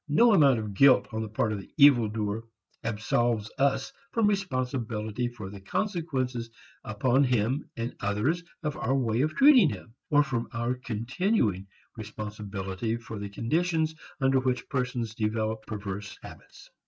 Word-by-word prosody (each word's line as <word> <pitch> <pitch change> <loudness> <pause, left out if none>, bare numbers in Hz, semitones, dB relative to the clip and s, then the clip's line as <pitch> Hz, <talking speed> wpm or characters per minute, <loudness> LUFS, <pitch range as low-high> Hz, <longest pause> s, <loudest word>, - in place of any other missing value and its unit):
No 230 +10 +5
amount 140 -9 +5
of 105 -2 -4
guilt 135 +5 +5
on 110 0 -3
the 110 - -4
part 110 +1 0
of 105 - -2
the 95 - -13
evil 140 -6 +7
doer 105 0 -3 0.4
absolves 110 0 0
us 140 - +1 0.2
from 225 -2 +2
responsibility 125 - -1
for 110 -5 -8
the 100 -1 -10
consequences 130 - -2 0.3
upon 125 +6 +2
him 125 +2 0
and 115 +2 -4
others 105 +13 0 0.2
of 150 -2 -2
our 135 - 0
way 120 -3 +1
of 155 +2 0
treating 270 - +7
him, 115 - -8 0.2
or 145 0 +5
from 120 -4 -2
our 120 +1 -1
continuing 120 - -1 0.3
responsibility 105 -1 -4
for 115 -2 -8
the 100 0 -5
conditions 160 - 0 0.3
under 135 -1 +3
which 130 -1 -1
persons 125 -5 -2
develop 110 0 -2
perverse 100 -1 -6
habits. - - -13
120 Hz, 150 wpm, -28 LUFS, 110-140 Hz, 0.4 s, evil